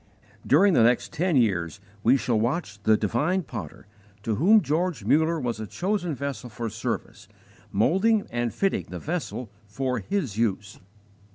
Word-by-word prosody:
During 190 +7 +5
the - - +5
next 120 +1 +2
ten 175 0 0
years 95 - +1 0.2
we 125 +6 +4
shall 120 -4 0
watch 115 -3 -2
the 110 +1 +4
divine 150 - 0
Potter, 135 - -8 0.4
to 110 - -1
Whom 200 - +5
George 160 - -1
Muller 160 +7 +3
was 120 -5 -3
a 110 - -5
chosen 180 - -2
vessel 140 -2 -5
for 115 0 -5
service, 110 +3 -5 0.4
moulding 195 - +2
and 120 -1 -1
fitting 195 -1 -1
the - - -6
vessel 150 - -4 0.2
for 125 +4 -2
His 130 - -3
use. 105 -2 -1
125 Hz, 155 wpm, -25 LUFS, 110-175 Hz, 0.4 s, During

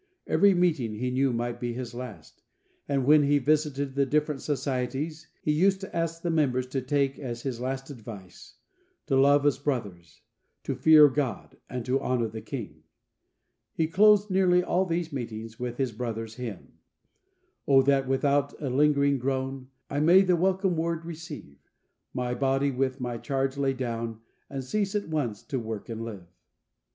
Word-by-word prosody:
Every 200 -1 +4
meeting 155 -11 +1
he 125 +3 -2
knew 135 +1 +2
might 120 0 -3
be 120 -1 -3
his 125 0 -6
last, 125 -3 -9 0.5
and 135 -2 +1
when 150 +2 +6
he 145 0 +3
visited 145 -1 0
the 140 0 +2
different 150 0 0
societies, 145 +3 -3 0.2
he 150 - +1
used 190 +5 +3
to 195 - -8
ask 165 0 -2
the 170 - 0
members 130 -6 +1
to 135 0 -2
take 135 +1 0
as 120 -4 -5
his 125 -3 -4
last 135 +2 -4
advice: 105 -7 -11 0.5
"To 135 - 0
love 140 +2 +5
as 145 -2 +2
brothers, 100 - -4 0.4
to - - -2
fear 155 -2 +7
God, 135 -5 -3
and 125 -2 -4
to 130 +2 +1
honour 125 -3 0
the 110 +1 -7
King." 105 - -7 0.9
He 160 - +2
closed 205 +4 +4
nearly 180 -1 +4
all 180 +1 +1
these 165 -2 -2
meetings 115 -3 -6
with 120 -1 -4
his 130 -3 0
brother's 115 -1 -5
hymn: 115 -6 -8 0.9
"O 135 -1 +6
that 135 -1 +2
without 140 +1 +1
a 140 -4 -3
lingering 140 0 +3
groan, 130 0 -2 0.2
I 145 - -2
may 170 +5 +6
the 185 -2 +3
welcome 190 +1 +1
Word 165 0 -2
receive; 155 - -9 0.5
My 125 -1 -2
body 135 +1 +1
with 130 +1 -1
my 120 -2 -4
charge 135 0 -1
lay 140 -1 +1
down, 115 -3 -4 0.3
And 135 -1 -4
cease 200 +8 -1
at 205 -5 -2
once 130 -10 -2
to 135 - -3
work 110 -1 -6
and 115 0 -4
live." 105 -6 -7
135 Hz, 170 wpm, -27 LUFS, 125-155 Hz, 0.9 s, fear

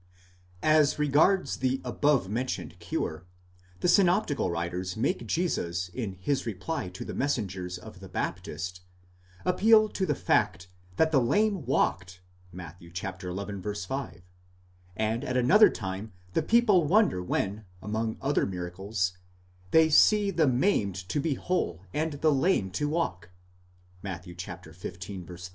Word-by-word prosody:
As 155 -2 +4
regards 150 +6 +3
the 130 0 0
above 135 -3 +2
mentioned 115 -5 -3
cure, 85 -1 -4 0.5
the - - +2
synoptical 175 - +3
writers 90 +3 -3
make 115 +1 -1
Jesus 90 - -1
in 105 -1 -4
his 120 +8 -2
reply 110 - -3
to 90 - -8
the - - -6
messengers 95 -10 -2
of 90 - -12
the - - -11
Baptist, 90 +1 -4 0.6
appeal 215 +4 +5
to 190 -2 -2
the - - +1
fact 95 +1 +1 0.3
that 160 +9 +3
the 135 -4 +4
lame 195 - +1
walked 90 -8 0 0.3
(Matt. 90 -2 -9
xi. 85 - -14
5), 95 - -5 0.8
and 110 +2 0
at 130 - -1
another 185 - +7
time 95 +2 -5 0.2
the - - +2
people 210 -2 +4
wonder 200 - +3
when, 100 +4 -2
among 110 +3 -2
other 140 +1 +1
miracles, 90 +1 -3 0.5
they 160 +6 +6
see 205 +5 +5
the 165 -4 +2
maimed 125 - +2
to 145 - 0
be 145 -1 0
whole 95 - -2
and 155 +1 -1
the 155 -2 +4
lame 135 - +2
to 145 +10 -1
walk 90 - -2 0.7
(Matt. 90 -2 -6
xv. 85 -3 -9
31). 90 0 -7
110 Hz, 135 wpm, -28 LUFS, -, 0.8 s, another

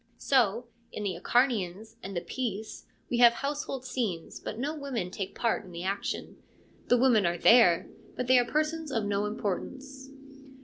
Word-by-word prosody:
So 240 -3 +2 0.3
in 210 - -5
the 190 -3 -2
Acharnians 220 -1 0
and 195 -2 -6
the - - -1
Peace 220 -4 -5 0.2
we 240 - +1
have 240 -1 +8
household 275 -1 -4
scenes, 220 -10 -3
but 215 - -6
no 280 +6 -2
women 270 - -4
take 190 0 -5
part 230 -3 0
in 185 - -13
the 170 0 -6
action: 195 +2 -4 0.5
the 245 - +4
women 240 -4 +4
are 170 0 -1
there, 200 -5 +5 0.3
but 250 - -2
they 255 0 +6
are 245 - +2
persons 310 +2 -1
of 225 -4 0
no 205 0 0
importance. 265 +6 -5
235 Hz, 170 wpm, -29 LUFS, 200-260 Hz, 0.5 s, have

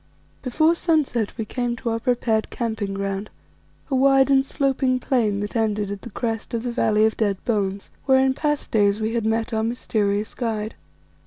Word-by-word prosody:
Before 310 +6 +3
sunset 305 - 0
we 220 - -2
came 245 +1 -2
to 235 0 -3
our 225 - -1
prepared 230 -3 0
camping 220 -4 -3
ground, 195 +1 -3 0.6
a - - +2
wide 270 +1 +4
and 270 -1 +5
sloping 270 -2 0
plain 220 -6 +1
that 205 +2 -5
ended 210 -3 0
at 200 -1 -5
the - - -8
crest 225 +1 -3
of 230 - -2
the 245 - -2
Valley 215 -2 +3
of 220 - +1
Dead 205 -3 0
Bones, 200 -4 -1
where 265 -1 +5
in 265 - +2
past 295 +1 -2
days 205 -1 +3
we 220 +1 -1
had 230 -2 0
met 225 +1 0
our 220 - +1
mysterious 215 -3 -1
guide. 220 -3 -3
225 Hz, 185 wpm, -23 LUFS, 210-255 Hz, 0.6 s, and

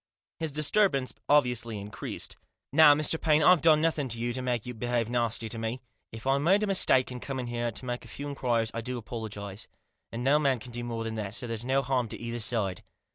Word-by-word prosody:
His 160 -2 -1
disturbance 150 -2 +2 0.2
obviously 125 -6 +2
increased. 100 -1 -5 0.2
" - - -54
Now, 150 -1 +8
Mr. 155 +2 +1
Paine, 155 -1 +3
I've 180 0 +6
done 155 -2 +5
nothing 155 -4 0
to 115 -2 -4
you 120 +1 -2
to 130 - -2
make 125 -3 -2
you 125 - -5
behave 120 0 -1
nasty 115 -2 0
to 115 - -5
me. 115 +3 -3 0.3
If 110 +1 -9
I 135 +1 +2
made 190 +8 +3
a - - +3
mistake 185 -10 +4
in 125 - -6
coming 130 -1 -4
here 120 0 -2
to 115 +3 -7
make 120 0 -4
a - - -12
few 145 - -7
inquiries 120 -5 0
I 115 - -3
apologise, 110 -4 -6 0.4
and 115 +1 -4
no 140 +3 +4
man 135 -3 +2
can 120 +2 -9
do 120 0 -5
more 115 -1 -4
than 115 0 -4
that, 100 0 -5
so - - -4
there's 115 -1 -3
no 135 +2 +1
harm 130 -2 0
done - - -7
to - - -16
either 115 0 -4
side." 105 -5 -1
125 Hz, 235 wpm, -28 LUFS, 115-140 Hz, 0.4 s, Now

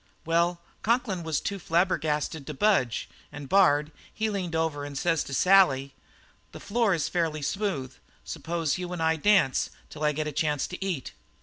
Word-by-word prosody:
"Well, 170 +1 +1 0.2
Conklin 220 -5 0
was 160 -3 -1
too 200 -1 -4
flabbergasted 160 -4 0
to 150 - -5
budge, 160 - +2 0.2
and 145 -1 -8
Bard, 150 -4 +4 0.2
he 220 0 -1
leaned 180 -5 -3
over 160 -3 -1
and 145 -1 -6
says 165 +1 +1
to - - -9
Sally: 140 -7 +4 0.6
'This - - -10
floor 220 -3 +2
is 160 - -1
fairly 160 -4 -1
smooth. 145 -7 -2 0.3
Suppose 165 +1 -2
you 180 0 -4
and 170 -2 -2
I 160 0 +3
dance 165 -4 +3 0.2
till 155 - -7
I 150 - +3
get 150 +1 -2
a 150 - -3
chance 150 -1 0
to 180 +1 -6
eat?' 175 -9 -3
165 Hz, 175 wpm, -27 LUFS, 150-185 Hz, 0.6 s, Bard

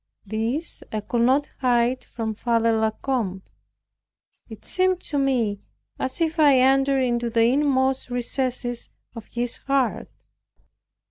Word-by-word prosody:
This 225 - -2
I 215 - -2
could 235 +3 -1
not 265 +4 +3
hide 245 -1 +1
from 225 -2 -4
Father 230 +1 +1
La 220 0 +2
Combe. 215 -6 -3 1.1
It 220 - -11
seemed 370 -1 +1
to 290 - -2
me 240 -7 +1 0.4
as 260 +4 -3
if 325 0 0
I 290 -3 +6
entered 270 +1 +3
into 240 -1 0
the 230 0 +2
inmost 265 0 +1
recesses 245 0 -2 0.2
of 230 -3 -9
his 240 0 -2
heart. 275 -3 -1
245 Hz, 130 wpm, -24 LUFS, 230-270 Hz, 1.1 s, I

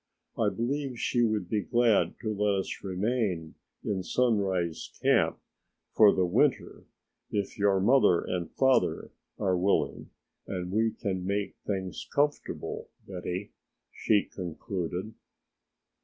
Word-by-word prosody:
I - - +2
believe 130 +1 -2
she 120 - +1
would 110 -5 +1
be 105 +2 0
glad 120 0 +2
to 110 -1 -1
let 105 0 +1
us - - -7
remain 95 -4 -1 0.3
in 100 -2 -1
Sunrise 95 -7 0
Camp - - +3 0.6
for 105 -2 +7
the 95 - +2
winter 120 +10 +1 0.4
if 100 -2 -2
your 100 -1 +3
mother 105 -4 +4
and 90 -2 -3
father 130 -1 +2 0.3
are 95 -3 +1
willing 95 +3 0 0.4
and 90 -2 -4
we 110 +3 +2
can 95 -4 -3
make 100 +2 -2
things 95 -2 -3
comfortable, 145 +1 -1 0.2
Betty," 90 +1 -5 0.4
she 105 -2 +2
concluded. 90 +2 -5
100 Hz, 120 wpm, -29 LUFS, 90-115 Hz, 0.6 s, for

